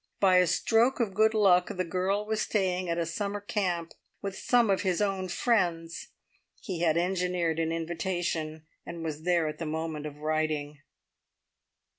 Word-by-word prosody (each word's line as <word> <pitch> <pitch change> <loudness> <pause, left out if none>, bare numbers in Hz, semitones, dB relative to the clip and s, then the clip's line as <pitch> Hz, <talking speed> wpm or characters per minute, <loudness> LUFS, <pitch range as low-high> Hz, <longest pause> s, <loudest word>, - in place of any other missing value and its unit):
By 190 -2 +5
a 180 -1 +5
stroke 235 +10 +2
of 220 -5 0
good 220 +2 +3
luck 185 -4 +5
the 185 -1 -2
girl 190 +4 -1
was 220 0 -1
staying 185 -3 0
at 170 - 0
a 170 - 0
summer 200 +5 -3
camp 185 -5 -2 0.3
with 195 -1 -5
some 240 -2 +3
of 195 - +1
his 185 -2 0
own 195 -2 0
friends. 175 -5 0 0.5
He 185 -6 -5
had 165 -1 +2
engineered 180 -2 0
an 165 0 0
invitation, 165 -2 -3 0.2
and 170 -1 -7
was 155 -1 -4
there 175 -3 +2
at 150 - -5
the 165 - -3
moment 155 -1 -3
of 145 -1 -9
writing. 155 -1 -2
180 Hz, 165 wpm, -29 LUFS, 165-195 Hz, 0.5 s, By